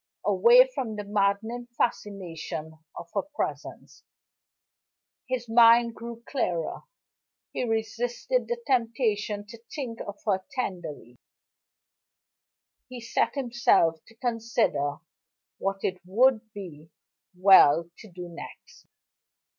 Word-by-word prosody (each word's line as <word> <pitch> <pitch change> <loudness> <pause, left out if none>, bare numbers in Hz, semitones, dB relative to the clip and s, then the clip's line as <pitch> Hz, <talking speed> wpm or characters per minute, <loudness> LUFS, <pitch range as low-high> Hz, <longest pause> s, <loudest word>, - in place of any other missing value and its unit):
Away - - +6
from 225 - -3
the 210 - -4
maddening 210 +4 -1
fascination 170 -8 -3 0.2
of 170 - -9
her 200 - +1
presence, 295 +5 -6 1.3
his 250 -2 -2
mind 230 0 +6
grew 235 0 -9
clearer. 175 - -2 0.7
He - - -1
resisted 240 - -1
the 480 - -2
temptation 225 -5 0
to 230 +2 -13
think 245 -6 -5
of 205 0 -7
her 190 -3 +1
tenderly; 165 - -5 1.7
he 255 -1 -7
set 230 +4 0
himself 235 - +2
to 225 - -18
consider 230 - 0 0.6
what 195 0 -2
it 185 -1 -2
would 220 +3 +2
be 165 -7 -10 0.5
well 170 -3 +6
to 215 - -12
do 175 0 -8
next. 170 -1 -12
220 Hz, 105 wpm, -27 LUFS, 185-240 Hz, 1.7 s, Away